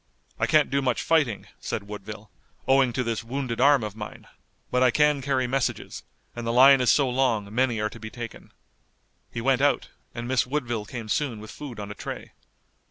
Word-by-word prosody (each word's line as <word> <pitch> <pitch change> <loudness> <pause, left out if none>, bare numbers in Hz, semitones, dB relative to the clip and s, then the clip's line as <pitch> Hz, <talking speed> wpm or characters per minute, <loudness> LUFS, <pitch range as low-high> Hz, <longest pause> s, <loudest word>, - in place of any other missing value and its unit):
"I - - +2
can't 150 -3 +3
do 140 +1 +2
much 125 -3 0
fighting," 145 -11 +1
said 100 - -4
Woodville, 105 0 -9 0.4
"owing 135 -1 +4
to 130 - 0
this 115 0 -2
wounded 125 0 -3
arm 140 -2 +5
of 105 -1 -5
mine, 105 -1 -8 0.5
but 125 - +2
I 130 - +6
can 150 +2 +3
carry 130 -1 0
messages, 130 0 -2 0.3
and 120 -1 -5
the - - +1
line 130 +2 +7
is 125 - +3
so 140 -3 +4
long 120 -5 0
many 120 -2 +1
are 105 0 0
to 115 - -11
be 110 0 -7
taken." 120 0 -9 0.8
He 115 - -4
went 135 +1 +2
out 145 0 +2 0.3
and 120 0 -4
Miss 130 -1 +1
Woodville 120 -6 -2
came 115 0 -7
soon 120 -1 -1
with 110 0 -10
food 130 -7 -8
on 105 0 -6
a - - -4
tray. - - -7
125 Hz, 200 wpm, -26 LUFS, 110-135 Hz, 0.8 s, line